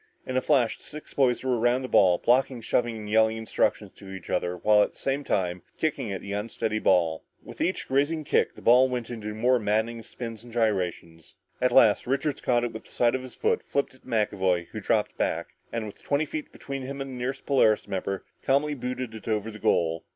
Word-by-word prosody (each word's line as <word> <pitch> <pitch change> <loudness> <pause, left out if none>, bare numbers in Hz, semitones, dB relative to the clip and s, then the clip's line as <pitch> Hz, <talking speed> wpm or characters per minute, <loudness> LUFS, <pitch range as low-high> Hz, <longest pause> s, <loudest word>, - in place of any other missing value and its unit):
In 130 - -4
a 130 - +3
flash, 130 -6 +2
the - - -14
six 150 +1 -9
boys 130 -3 +2
were 125 -3 +1
around 120 +3 +2
the - - -3
ball, 90 -7 +5
blocking, 125 +3 +2
shoving, 115 0 0
and 105 -1 -7
yelling 110 +1 +3
instructions 110 0 0
to 95 - -11
each 95 -3 -8
other 90 0 -1
while 105 +4 +4
at - - +1
the - - -15
same 140 +1 -1
time 90 -7 -1 0.2
kicking 145 -8 -1
at 95 - -4
the 100 - -7
unsteady 110 +1 -2
ball. 85 -6 +2 0.2
With - - -10
each 185 - -1
grazing 145 +4 +1
kick, 145 - +1
the - - -13
ball 125 +2 +6
went 125 -2 -3
into 110 -3 -6
even 105 0 -5
more 125 +1 +4
maddening 110 +2 0
spins 115 -1 -7
and 120 - -13
gyrations. 90 -8 -2 0.3
At 125 0 +3
last 110 -3 +5
Richards 140 +2 -1
caught 120 -1 +2
it 120 - -1
with 110 - -8
the - - -17
side 120 -1 +2
of 130 - -1
his 130 -1 -9
foot, 450 0 +1
flipped 140 - -1
it 130 - -20
to - - -22
McAvoy 95 -6 0
who - - -6
dropped - - 0
back, - - -1 0.2
and 115 -2 -3
with 105 - -10
twenty 145 +2 0
feet 155 +1 -6
between 135 -1 -6
him 140 +2 -6
and 135 -1 -5
the - - -7
nearest 125 +2 -4
Polaris 110 -8 +3
member, 95 0 -3 0.2
calmly 140 +3 +2
booted 125 -2 -4
it 110 - -10
over 110 0 -1
the 105 - -10
goal. 80 -3 +1
115 Hz, 230 wpm, -27 LUFS, 105-130 Hz, 0.3 s, ball